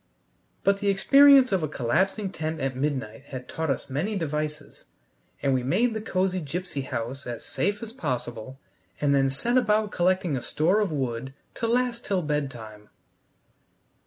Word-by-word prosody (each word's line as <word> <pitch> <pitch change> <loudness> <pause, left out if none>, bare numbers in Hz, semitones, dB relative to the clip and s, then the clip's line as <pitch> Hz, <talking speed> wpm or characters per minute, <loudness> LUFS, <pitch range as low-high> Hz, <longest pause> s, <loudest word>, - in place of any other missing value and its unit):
But 200 0 +3
the 205 - -2
experience 270 +6 +6
of 190 -2 +2
a 155 - 0
collapsing 190 - 0
tent 160 -2 -4
at 135 -2 -2
midnight 135 -3 -3
had 130 -2 -8
taught 160 -1 -3
us 135 - -1
many 160 +11 -2
devices, 150 -3 -4 0.6
and 135 - +3
we 130 - +1
made 195 - +1
the 220 - -3
cosy 185 -3 0
gipsy 165 -1 -4
house 130 +1 -5
as 120 -1 -6
safe 205 +4 -1
as 225 0 -7
possible, 125 - -4 0.4
and 145 -1 +2
then 135 -1 +3
set 235 - +2
about 215 -3 +1
collecting 180 -3 +1
a 125 - -2
store 175 - +1
of 205 -5 0
wood 130 -2 -3 0.2
to 230 - -2
last 245 0 0
till 190 -3 0
bedtime. 120 -8 -4
155 Hz, 160 wpm, -26 LUFS, 135-200 Hz, 0.6 s, experience